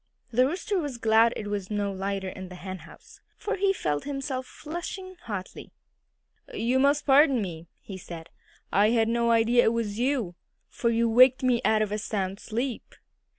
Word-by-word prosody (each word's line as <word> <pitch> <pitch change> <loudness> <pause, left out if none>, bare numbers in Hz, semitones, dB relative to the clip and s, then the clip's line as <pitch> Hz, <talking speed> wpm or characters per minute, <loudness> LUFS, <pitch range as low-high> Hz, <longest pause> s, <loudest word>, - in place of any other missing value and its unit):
The 250 +2 +4
Rooster 375 - -2
was 290 -6 -4
glad 225 0 +4
it 210 - -5
was 205 -2 -4
not 205 -2 -2
lighter 195 0 -3
in 185 0 -8
the 180 - -9
henhouse, 185 -2 -10 0.2
for 430 - -2
he 390 +1 +3
felt 150 - -2
himself 270 -2 -4
flushing 350 +4 -7
hotly. 195 -4 -7 0.8
"You 260 - 0
must 285 +2 +3
pardon 275 -2 +5
me," 170 -5 -5 0.2
he 190 -2 -8
said. 170 -2 -10 0.4
"I 205 +2 +4
had 225 -1 +2
no 235 0 +1
idea 230 +1 +4
it 225 - +3
was 225 -2 -2
you, 245 -8 0 0.4
for 235 - -1
you 230 0 +2
waked 255 +3 +5
me 250 -2 +2
out 215 -1 +3
of 210 - -4
a 210 - -1
sound 195 -2 -3
sleep." 235 +3 -4
230 Hz, 175 wpm, -27 LUFS, 200-265 Hz, 0.8 s, pardon